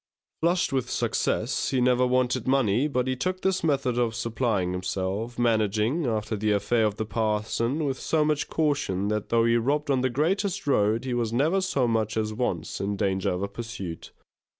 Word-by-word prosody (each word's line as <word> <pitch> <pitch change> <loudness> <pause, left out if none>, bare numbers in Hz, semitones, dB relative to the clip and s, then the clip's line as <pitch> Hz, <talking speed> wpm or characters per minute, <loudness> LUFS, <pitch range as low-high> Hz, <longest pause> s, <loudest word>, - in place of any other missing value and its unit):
Flushed 170 -2 +1
with 130 -2 +1
this - - -4
success, - - 0
he 130 - +1
never 125 0 +3
wanted 125 -1 +1
money 130 -1 +2
but 125 -4 0
he 130 0 -1
took 185 +8 -2
this 190 -2 0
method 135 -6 +1
of 115 -2 0
supplying 115 -5 -1
himself, 95 +5 -3
managing, 115 - +1
after 110 -1 -1
the 105 +1 0
affair 110 +2 +2
of 105 - -3
the 110 - -3
parson, 115 +6 -1
with 135 -2 -2
so 155 -2 +1
much 150 -1 0
caution 140 - 0
that 105 -1 -2
though 115 -1 +3
he 115 0 +3
robbed 145 +5 0
on 130 -2 +2
the 130 - +1
greatest 175 - 0
road, 110 -3 +2
he 130 - -2
was 120 -2 -1
never 155 +11 +2
so 140 -10 +1
much 110 -1 0
as 110 -1 -1
once 95 -8 -3
in 100 +1 -1
danger 95 -2 0
of 90 +2 -2
a - - -1
pursuit. 100 -5 -7
120 Hz, 195 wpm, -26 LUFS, 105-135 Hz, -, never